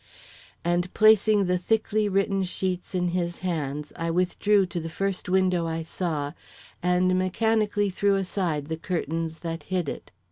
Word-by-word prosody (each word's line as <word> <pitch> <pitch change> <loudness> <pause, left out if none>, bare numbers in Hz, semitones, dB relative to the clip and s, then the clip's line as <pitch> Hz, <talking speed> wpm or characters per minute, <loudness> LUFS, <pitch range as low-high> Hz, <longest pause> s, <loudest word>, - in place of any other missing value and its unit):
And 175 +1 +1
placing 215 -1 +5
the 180 0 +1
thickly 215 +1 +1
written 195 0 +1
sheets 185 0 -3
in 180 -1 +1
his 175 -1 -2
hands 150 -4 -3
I 165 0 -2
withdrew 185 +3 +2
to 175 -1 -4
the 165 0 -5
first 195 +2 -2
window 185 -2 +2
I 165 0 -2
saw 160 -4 -3 0.5
and 180 +1 +2
mechanically 205 +1 +1
threw 200 +2 +2
aside 180 -6 -1
the 160 +2 -4
curtains 165 -1 -3
that 165 0 -4
hid 180 -4 0
it. - - -6
180 Hz, 150 wpm, -26 LUFS, 165-195 Hz, 0.5 s, placing